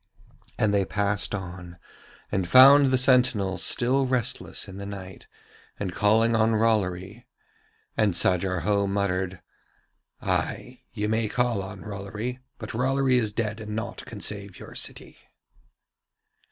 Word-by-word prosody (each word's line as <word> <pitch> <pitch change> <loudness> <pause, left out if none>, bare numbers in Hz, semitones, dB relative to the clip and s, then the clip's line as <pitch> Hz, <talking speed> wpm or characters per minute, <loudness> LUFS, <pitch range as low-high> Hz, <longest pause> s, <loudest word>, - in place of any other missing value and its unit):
And 105 -2 +1
they 100 -1 +3
passed 100 +1 -1
on 90 -2 -8 0.5
and 95 -3 -1
found 135 +6 +8
the 130 0 +2
sentinel 125 -7 +3
still 130 +2 +1
restless 125 -5 -1
in 95 0 -9
the 100 - -6
night 95 -2 -9 0.5
and 95 -4 -3
calling 110 +4 +3
on 110 0 +3
Rollory. 105 0 -1 0.7
And 105 -5 +2
Sajar 90 +1 +2
Ho 100 -1 +1
muttered: 95 -2 -2 0.8
'Ay, - - -3
you 105 0 -3
may 110 0 0
call 120 -4 0
on 95 0 -8
Rollory, 105 +4 -5 0.2
but 110 -2 -7
Rollory 130 +1 +2
is 110 -3 -1
dead 105 0 -3
and 105 -1 -6
naught 110 - -5
can - - -9
save 100 -3 -4
your - - -11
city.' - - -5
105 Hz, 135 wpm, -25 LUFS, 95-115 Hz, 0.8 s, found